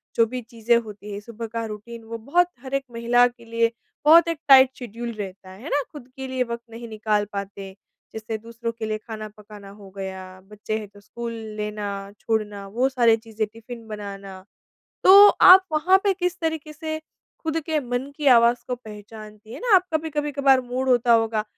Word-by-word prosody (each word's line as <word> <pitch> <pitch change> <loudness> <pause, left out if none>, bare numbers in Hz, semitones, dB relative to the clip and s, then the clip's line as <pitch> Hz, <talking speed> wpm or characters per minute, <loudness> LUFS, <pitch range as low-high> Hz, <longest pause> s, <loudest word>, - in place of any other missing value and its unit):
जो 230 - +4
भी 250 +2 -5
चीज़ें 235 0 +1
होती 210 -2 -7
हैं, 200 - -5
सुबह 230 +1 -8
का 230 +1 -4
रूटीन 225 +2 -9
वो 230 +1 -7
बहुत 290 +10 +2
हर 265 0 -10
एक 275 0 0
महिला 240 +1 +3
के 240 -1 -14
लिए 230 0 +1 0.3
बहुत 335 +3 +7
एक 330 -2 -2
टाइट 265 -1 +8
शेड्यूल 235 0 -6
रहता 195 -2 -8
है, 190 +2 -13
है 310 - -6
ना? 290 - +1
खुद 290 -5 -11
के 265 -1 -6
लिए 260 -1 -1
वक़्त 235 -1 -6
नहीं 230 +1 -9
निकाल 215 -1 0
पाते, 200 -1 -6 0.4
जैसे 220 0 -5
दूसरों 230 +1 -6
के 230 -1 -6
लिए 215 0 -2
खाना 215 0 -8
पकाना 210 -1 -13
हो 200 -1 -13
गया, 190 -1 -7
बच्चे 210 +2 -5
हैं 210 - -8
तो 205 +1 -18
स्कूल 235 +3 -7 0.2
लेना, 205 -2 -5
छोड़ना, 210 -3 -2
वो 245 +7 0
सारी 240 -4 +4
चीज़ें 220 -1 -4
टिफिन 230 +1 -11
बनाना। 200 -3 -8 0.6
तो 400 +2 +10
आप 375 -1 +8
वहाँ 345 +5 +4
पे 400 - +3
किस 360 -1 -2
तरीके 320 -2 -3
से 315 +1 -5
ख़ुद 315 +1 -7
के 315 -2 0
मन 250 +1 -4
की 300 - -4
आवाज 235 -2 +5
को 250 - -1
पहचानती 215 -1 -12
है - - -7
ना। 475 -4 +3
आपका 325 -4 -1
कभी-कभार 280 -2 +2
मूड 255 +1 -3
होता 245 -1 +4
होगा, 225 -2 +2
230 Hz, 195 wpm, -23 LUFS, 210-265 Hz, 0.6 s, तो